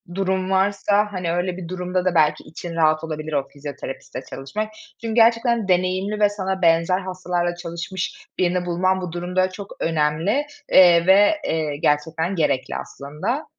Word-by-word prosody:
durum 190 -1 -1
varsa, 200 +2 +2
hani, 180 -3 -2
öyle 175 +1 -1
bir 180 -2 -7
durumda 180 0 -2
da 185 -1 +1
belki 155 -2 +3
için 165 +1 -8
rahat 155 -1 +2
olabilir 155 -1 -5
o 140 -2 0
fizyoterapistle 140 -2 -7
çalışmak. 210 +11 -4 0.3
Çünkü 225 -1 -3
gerçekten 230 -1 +3
deneyimli 185 +3 +1
ve 205 -1 +5
sana 190 -2 -3
benzer 165 +2 +3
hastalarla 180 -2 -2
çalışmış 175 +2 -5
birini 180 0 +1
bulman 185 +2 +1
bu 180 -2 -5
durumda 180 +2 0
çok 195 +1 -9
önemli, 165 - +1 0.3
eee, 175 -2 +7
ve, 205 +9 +6
eee, 155 -3 -1
gerçekten 160 +5 0
gerekli 150 -6 0
aslında. 190 - -4
180 Hz, 150 wpm, -22 LUFS, 165-190 Hz, 0.3 s, eee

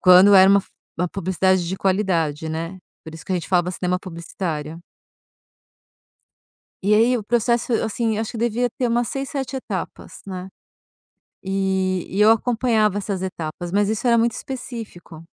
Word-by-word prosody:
quando 185 +2 +7
era 190 0 +8
uma 200 0 +5
f - - -21 0.3
uma 180 +1 0
publicidade 185 -1 0
de 190 - -3
qualidade, 175 -6 0
né, 165 +4 -4 0.3
por 160 - -9
isso 160 - -11
que - - -3
a - - +2
gente 175 - -3
falava 180 -1 +2
cinema 180 0 -1
publicitário. 165 -3 -5 2.0
E 205 +2 +3
aí 235 +3 +4
o 220 - -5
processo, 235 +2 +1
assim, 220 0 -1
acho 220 0 -3
que 235 - -7
devia 240 +2 0
ter 250 - +1
umas 240 0 0
6, 270 0 -4
7 275 -2 -4
etapas, 195 -10 -6
né. 185 -1 -6 1.0
E 190 -1 0
e 195 - -1
eu 210 - +7
acompanhava 225 -3 +2
essas 195 -2 -3
etapas, 175 -1 -5
mas 205 +1 +2
isso 220 +3 -1
era 235 -1 +5
muito 230 0 +2
específico, 225 -11 -8
195 Hz, 165 wpm, -22 LUFS, 180-225 Hz, 2.0 s, era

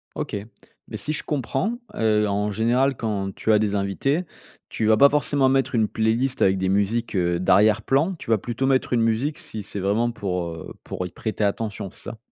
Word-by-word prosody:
OK, - - -4 0.5
mais - - -6
si 155 - -2
je 155 - -1
comprends, 150 - -2 0.2
heu, 105 -1 +2
en 105 +1 -1
général 125 +6 +2
quand 100 -4 -3
tu 110 - 0
as 105 - +6
des 105 -1 0
invités, 105 - 0 0.4
tu 110 - -2
vas 110 0 +5
pas 140 +5 +7
forcément 145 -2 +2
mettre 135 0 +1
une 110 -3 +2
playlist 115 +5 0
avec 95 0 +3
des 95 0 0
musiques, 105 +4 0
heu, 85 -2 +1
d'arrière-plan, 110 - +3
tu - - -9
vas 110 - +4
plutôt 120 +5 -2
mettre 130 -1 +1
une 120 - +3
musique 115 +7 0
si 110 -2 -7
c'est 100 0 -6
vraiment 105 +5 +1
pour, 90 -5 -3
heu, 80 -1 -9
pour 90 - -5
y - - -11
prêter 110 -1 -3
attention, 100 -1 -2
c'est - - -9
ça? - - -12
110 Hz, 205 wpm, -23 LUFS, 100-130 Hz, 0.5 s, pas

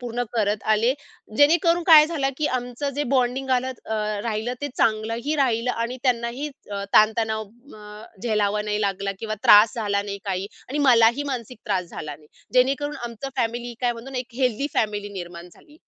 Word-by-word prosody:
पूर्ण 245 0 -3
करत 210 -2 0
आले. 230 +4 +2 0.4
जेणेकरून 335 +3 +4
काय 310 -2 +9
झालं 290 -5 -1
की 300 - +1
आमचं 245 +3 -4
जे - - +2
बॉन्डिंग 260 +1 0
आलं 255 0 +2 0.2
अ, 220 - -3 0.3
राहिलं 225 +2 -2
ते 290 - -2
चांगलंही 230 +6 0
राहिलं 250 -3 +1
आणि 235 +2 -3
त्यांनाही 245 +2 -1 0.2
च 200 -1 -4
ताणतणाव 220 0 +3 0.3
अ, 210 0 -11 0.2
झेलावा 210 -2 +1
नाही 210 0 -2
लागला 195 -1 -1
किंवा 215 -1 -3
त्रास 210 +1 +7
झाला 205 -3 -1
नाही 200 0 -6
काही 190 -1 -2 0.2
आणि 285 - -3
मलाही 235 +2 +5
मानसिक 245 -1 -6
त्रास 190 -3 0
झाला 150 -2 -6
नाही. 150 - -21 0.3
जेणेकरून 275 +4 +2
आमचं 235 +3 -6
फॅमिली 240 0 -2
काय 245 -1 +1
म्हणतो 235 +3 -10
ना, 260 - -3
एक 245 -1 -7
हेल्दी 255 +1 0
फॅमिली 205 -2 -1
निर्माण 175 -2 -8
झाली. 300 - -20
230 Hz, 175 wpm, -23 LUFS, 210-255 Hz, 0.4 s, काय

